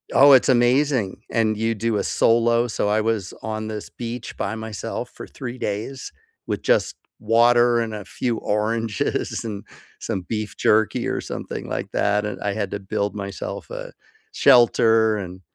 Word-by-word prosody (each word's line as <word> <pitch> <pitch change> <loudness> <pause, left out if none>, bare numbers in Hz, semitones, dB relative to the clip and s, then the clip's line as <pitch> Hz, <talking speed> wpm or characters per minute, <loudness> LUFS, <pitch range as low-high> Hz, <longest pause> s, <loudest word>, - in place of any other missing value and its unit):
Oh, 140 +1 +8
it's 130 - +5
amazing, 125 -4 +2
and 110 -2 +1
you 115 +1 0
do 115 0 -1
a - - 0
solo, 115 +1 +3
so 105 -2 -1
I 105 +1 +2
was 110 -4 -1
on 110 0 -4
this 105 -1 -6
beach 120 0 -6
by 100 - -2
myself 110 -1 -5
for - - -10
3 125 0 -7
days, 115 +5 -4 0.3
with - - -3
just - - +1 0.2
water 120 +2 +4
and 110 -2 -2
a 105 - -6
few 120 -3 -2
oranges, 110 +1 -1
and 105 -3 -5 0.4
some 95 - -3
beef 105 +1 -4
jerky, 110 0 +2
or - - -2
something - - -6
like - - -4
that, 105 +1 +1
and 105 - -4
I 100 -1 -1
had 100 -2 -2
to 100 - -3
build 100 +1 -2
myself 100 -3 -6
a - - -6 0.4
shelter, 115 -2 +5
and, 90 -2 -7
110 Hz, 165 wpm, -22 LUFS, 105-120 Hz, 0.4 s, Oh